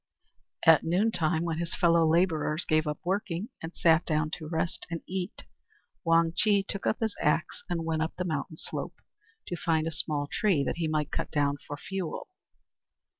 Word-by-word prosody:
At 160 Hz, -2 st, +7 dB
noontide, 170 Hz, -2 st, +1 dB
when 165 Hz, -1 st, -2 dB
his 170 Hz, -1 st, -2 dB
fellow 170 Hz, -1 st, +4 dB
labourers 165 Hz, -2 st, +2 dB
gave 155 Hz, -1 st, +2 dB
up 150 Hz, -, -1 dB
working, 195 Hz, +1 st, -1 dB
and 160 Hz, -, -5 dB
sat 165 Hz, 0 st, +4 dB
down 155 Hz, -1 st, 0 dB
to 155 Hz, -, -5 dB
rest 165 Hz, +1 st, -2 dB
and 165 Hz, -1 st, -4 dB
eat, 185 Hz, +1 st, -4 dB, 0.6 s
Wang 165 Hz, 0 st, +4 dB
Chih 200 Hz, +1 st, +3 dB
took 200 Hz, 0 st, -5 dB
his 220 Hz, -2 st, -1 dB
axe 150 Hz, +2 st, +1 dB
and 170 Hz, -2 st, -1 dB
went 160 Hz, -1 st, 0 dB
up 160 Hz, -, -2 dB
the 180 Hz, -, -2 dB
mountain 155 Hz, -1 st, -3 dB
slope -, -, -5 dB, 0.5 s
to 175 Hz, -, -3 dB
find 160 Hz, -2 st, +1 dB
a 165 Hz, -, -1 dB
small 150 Hz, -2 st, -2 dB
tree 170 Hz, -1 st, +1 dB
that -, -, -2 dB
he 165 Hz, -2 st, 0 dB
might 155 Hz, -1 st, -1 dB
cut -, -, -2 dB
down 145 Hz, -1 st, +1 dB
for 145 Hz, -, -5 dB
fuel. 190 Hz, -, -5 dB
165 Hz, 175 wpm, -29 LUFS, 155-175 Hz, 0.6 s, At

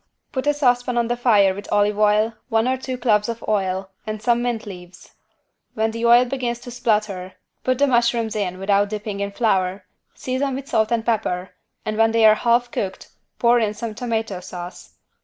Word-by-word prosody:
Put 260 Hz, 0 st, -3 dB
a 295 Hz, -, +4 dB
saucepan 245 Hz, -3 st, +1 dB
on 235 Hz, -1 st, +1 dB
the 240 Hz, -, +1 dB
fire 210 Hz, -6 st, +4 dB
with 200 Hz, +2 st, -9 dB
olive 205 Hz, 0 st, +2 dB
oil, 215 Hz, +2 st, +3 dB, 0.2 s
one 225 Hz, 0 st, +2 dB
or 260 Hz, -, +2 dB
two 260 Hz, 0 st, -5 dB
cloves 215 Hz, -3 st, +2 dB
of 230 Hz, 0 st, -5 dB
oil 190 Hz, -2 st, -1 dB, 0.2 s
and 215 Hz, 0 st, -3 dB
some 235 Hz, +2 st, +1 dB
mint 240 Hz, -1 st, -2 dB
leaves. 180 Hz, -3 st, -11 dB, 0.6 s
When 220 Hz, 0 st, 0 dB
the 230 Hz, +1 st, -1 dB
oil 240 Hz, +1 st, +7 dB
begins 245 Hz, -2 st, -2 dB
to 245 Hz, -, -9 dB
splutter, 210 Hz, -6 st, -1 dB, 0.3 s
put 255 Hz, 0 st, +1 dB
the 285 Hz, -, +4 dB
mushrooms 235 Hz, -4 st, +1 dB
in 185 Hz, -4 st, -2 dB
without 200 Hz, +1 st, +1 dB
dipping 210 Hz, -1 st, -5 dB
in 200 Hz, 0 st, -2 dB
flour, 195 Hz, -3 st, 0 dB, 0.3 s
season 260 Hz, +1 st, -2 dB
with 275 Hz, +1 st, -6 dB
salt 220 Hz, -3 st, +1 dB
and 230 Hz, -1 st, 0 dB
pepper 190 Hz, -5 st, -1 dB, 0.3 s
and 215 Hz, 0 st, -2 dB
when 225 Hz, 0 st, +3 dB
they 230 Hz, -1 st, +4 dB
are 215 Hz, -, +8 dB
half 240 Hz, +2 st, +1 dB
cooked 190 Hz, -1 st, -4 dB, 0.3 s
pour 240 Hz, 0 st, +4 dB
in 215 Hz, -2 st, -1 dB
some 225 Hz, 0 st, -5 dB
tomato 225 Hz, -4 st, -3 dB
sauce. 180 Hz, 0 st, -9 dB
220 Hz, 195 wpm, -22 LUFS, 205-240 Hz, 0.6 s, are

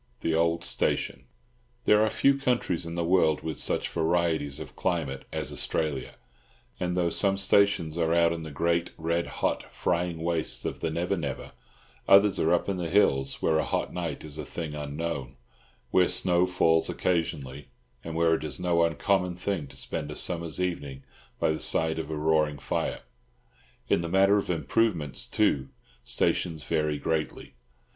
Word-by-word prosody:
THE 80 Hz, -, 0 dB
OLD 85 Hz, +1 st, +1 dB
STATION. -, -, -1 dB, 0.6 s
There 105 Hz, +1 st, +5 dB
are 110 Hz, -, +2 dB
few 140 Hz, +5 st, +3 dB
countries 120 Hz, -11 st, 0 dB
in 85 Hz, -, -5 dB
the 85 Hz, -, -1 dB
world 85 Hz, -3 st, +3 dB
with 80 Hz, 0 st, -4 dB
such -, -, +1 dB
varieties 80 Hz, -3 st, 0 dB
of -, -, -9 dB
climate 80 Hz, -7 st, -2 dB
as -, -, -2 dB
Australia, 75 Hz, -4 st, -2 dB, 0.6 s
and 90 Hz, 0 st, -1 dB
though 85 Hz, -1 st, +1 dB
some 100 Hz, -1 st, +1 dB
stations 95 Hz, -4 st, +2 dB
are 80 Hz, -1 st, +1 dB
out 85 Hz, 0 st, +4 dB
in 85 Hz, -, -5 dB
the 80 Hz, -, -7 dB
great, 85 Hz, +4 st, 0 dB
red 85 Hz, +1 st, -1 dB
hot, -, -, -2 dB
frying 85 Hz, -2 st, -1 dB
wastes 85 Hz, -2 st, -1 dB
of -, -, -3 dB
the 80 Hz, -, -1 dB
Never 85 Hz, +4 st, -1 dB
Never, 75 Hz, -7 st, -5 dB, 0.6 s
others 100 Hz, 0 st, +6 dB
are 80 Hz, -, +2 dB
up 90 Hz, -, +2 dB
in 100 Hz, -2 st, -1 dB
the 85 Hz, -2 st, -3 dB
hills 70 Hz, -8 st, +2 dB
where 80 Hz, -1 st, +3 dB
a -, -, +1 dB
hot -, -, -2 dB
night 85 Hz, -3 st, -4 dB
is 75 Hz, -2 st, -7 dB
a -, -, -3 dB
thing 80 Hz, -3 st, -6 dB
unknown, 75 Hz, -3 st, -4 dB, 0.6 s
where 90 Hz, -1 st, +4 dB
snow 90 Hz, 0 st, +2 dB
falls 80 Hz, -2 st, +2 dB
occasionally, 75 Hz, -6 st, -2 dB, 0.4 s
and 80 Hz, -1 st, -6 dB
where 85 Hz, 0 st, +3 dB
it 80 Hz, -, -1 dB
is 75 Hz, -1 st, -4 dB
no 90 Hz, -1 st, +2 dB
uncommon 90 Hz, +2 st, +1 dB
thing 90 Hz, -4 st, -3 dB
to -, -, -13 dB
spend -, -, -4 dB
a -, -, -6 dB
summer's 85 Hz, -1 st, 0 dB
evening 70 Hz, -7 st, -3 dB, 0.4 s
by -, -, +2 dB
the 80 Hz, -, -2 dB
side 80 Hz, 0 st, +1 dB
of 80 Hz, -, -5 dB
a 80 Hz, -, -3 dB
roaring 75 Hz, -1 st, +2 dB
fire. -, -, -2 dB, 0.9 s
In -, -, +2 dB
the 85 Hz, -, -4 dB
matter 95 Hz, +3 st, +4 dB
of -, -, -5 dB
improvements, 85 Hz, -, 0 dB
too, 70 Hz, -1 st, +1 dB, 0.3 s
stations 80 Hz, -4 st, 0 dB
vary 75 Hz, -1 st, 0 dB
greatly. 80 Hz, +1 st, -3 dB
85 Hz, 170 wpm, -27 LUFS, 80-90 Hz, 0.9 s, others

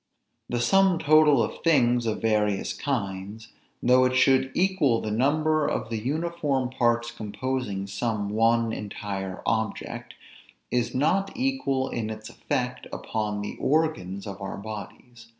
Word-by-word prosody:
The 120 Hz, -, -1 dB
sum 190 Hz, +8 st, +4 dB
total 150 Hz, -5 st, +5 dB
of -, -, -5 dB
things 125 Hz, -7 st, +3 dB
of 110 Hz, -, -2 dB
various 105 Hz, -3 st, +1 dB
kinds, 105 Hz, -4 st, -4 dB, 0.3 s
though 125 Hz, +1 st, +5 dB
it 130 Hz, 0 st, +1 dB
should 130 Hz, 0 st, +4 dB
equal 175 Hz, -11 st, +2 dB
the 110 Hz, -, -4 dB
number 155 Hz, +6 st, +2 dB
of 115 Hz, -, -2 dB
the 115 Hz, -, -1 dB
uniform 145 Hz, -1 st, -1 dB
parts 120 Hz, -1 st, +1 dB
composing 110 Hz, -2 st, -3 dB
some 105 Hz, +1 st, -2 dB
one 115 Hz, +1 st, +2 dB
entire 100 Hz, -2 st, -5 dB
object, 110 Hz, -1 st, -2 dB, 0.6 s
is 125 Hz, 0 st, 0 dB
not 195 Hz, +9 st, +2 dB
equal 250 Hz, -, 0 dB
in 110 Hz, -2 st, -3 dB
its 110 Hz, 0 st, -7 dB
effect 125 Hz, 0 st, -3 dB
upon 105 Hz, -2 st, -3 dB
the 105 Hz, -, -5 dB
organs 130 Hz, -, 0 dB
of 100 Hz, -1 st, -7 dB
our 95 Hz, -, -5 dB
bodies. 110 Hz, +3 st, -9 dB
120 Hz, 135 wpm, -26 LUFS, 105-140 Hz, 0.6 s, total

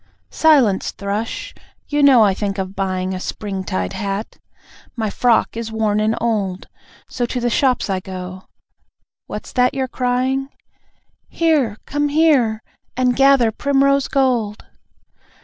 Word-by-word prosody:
Silence, 265 Hz, -12 st, +3 dB
Thrush! 210 Hz, -, -4 dB, 0.3 s
You 295 Hz, 0 st, 0 dB
know 265 Hz, -5 st, +7 dB
I 200 Hz, -2 st, +3 dB
think 200 Hz, 0 st, -3 dB
of 190 Hz, 0 st, -4 dB
buying 185 Hz, -1 st, -2 dB
A 185 Hz, -, -4 dB
Spring 195 Hz, 0 st, -5 dB
tide 95 Hz, -, -3 dB
hat; 200 Hz, +2 st, -4 dB, 0.6 s
my 220 Hz, -4 st, -2 dB
frock 235 Hz, 0 st, +2 dB
is 230 Hz, -1 st, -5 dB
worn 215 Hz, -1 st, 0 dB
and 215 Hz, +1 st, +1 dB
old. 205 Hz, -5 st, -1 dB, 0.4 s
So 245 Hz, -1 st, -2 dB
to 250 Hz, -, -3 dB
the 240 Hz, 0 st, -1 dB
shops 255 Hz, -1 st, +1 dB
I 190 Hz, -2 st, -1 dB
go. 185 Hz, 0 st, -8 dB, 0.8 s
What's -, -, -7 dB
that 250 Hz, +1 st, +2 dB
you're 265 Hz, -1 st, -1 dB
crying? 255 Hz, +2 st, -1 dB, 0.8 s
(Here! 295 Hz, -10 st, +1 dB
Come 290 Hz, +1 st, -1 dB
here! 280 Hz, -8 st, +2 dB, 0.3 s
And 250 Hz, -1 st, +2 dB
gather 270 Hz, -4 st, +4 dB
primrose 275 Hz, +2 st, +2 dB
gold.) 245 Hz, -6 st, 0 dB
230 Hz, 135 wpm, -19 LUFS, 200-265 Hz, 0.8 s, know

